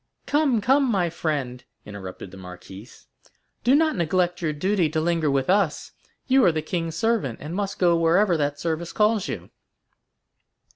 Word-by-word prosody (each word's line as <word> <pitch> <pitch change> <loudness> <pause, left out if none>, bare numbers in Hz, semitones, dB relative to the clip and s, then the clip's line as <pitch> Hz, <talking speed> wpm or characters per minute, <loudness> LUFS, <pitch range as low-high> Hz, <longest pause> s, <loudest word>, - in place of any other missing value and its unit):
"Come, 285 -7 +2
come, 270 +6 +3
my 190 -9 0
friend," 140 -7 -3 0.2
interrupted 95 -2 -9
the - - -12
marquise, 95 +4 -12 0.6
"do 250 +4 +4
not 315 +1 +2
neglect 175 +1 0
your 160 -3 0
duty 180 +2 0
to 155 +1 -1
linger 165 -1 +1
with 135 -1 0
us. 190 -5 +1 0.3
You 265 -1 +4
are 175 - +5
the 155 -1 -3
king's 165 -1 -3
servant, 215 - 0
and 150 +3 -7
must 200 +1 -3
go 175 -2 +3
wherever 170 +3 +3
that 145 -2 -1
service 165 0 -3
calls 210 -1 +2
you." - - -6
170 Hz, 160 wpm, -24 LUFS, 150-205 Hz, 0.6 s, are